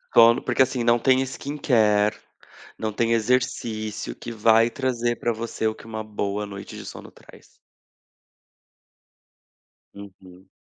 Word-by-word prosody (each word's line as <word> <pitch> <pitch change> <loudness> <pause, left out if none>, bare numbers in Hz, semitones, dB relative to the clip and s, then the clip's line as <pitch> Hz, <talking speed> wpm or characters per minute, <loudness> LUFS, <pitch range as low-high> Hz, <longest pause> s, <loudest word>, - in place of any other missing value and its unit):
Sono 115 0 +7
porque, 125 +1 +1
assim, 130 -2 +2
não 120 0 +4
tem, 130 +2 +3
skincare, 110 -7 +1 0.6
não 110 -1 -2
tem 115 +1 0
exercício 110 - -1
que 120 - -8
vai 115 +1 +4
trazer 120 -2 -1
para 120 - -1
você 110 0 -3
o 110 - -2
que - - -15
uma 110 -1 -5
boa 105 -1 -3
noite 100 -1 -9
de - - -9
sono - - -10
traz. - - -18 2.5
Uhum. 95 -2 -14
115 Hz, 130 wpm, -24 LUFS, 105-120 Hz, 2.5 s, Sono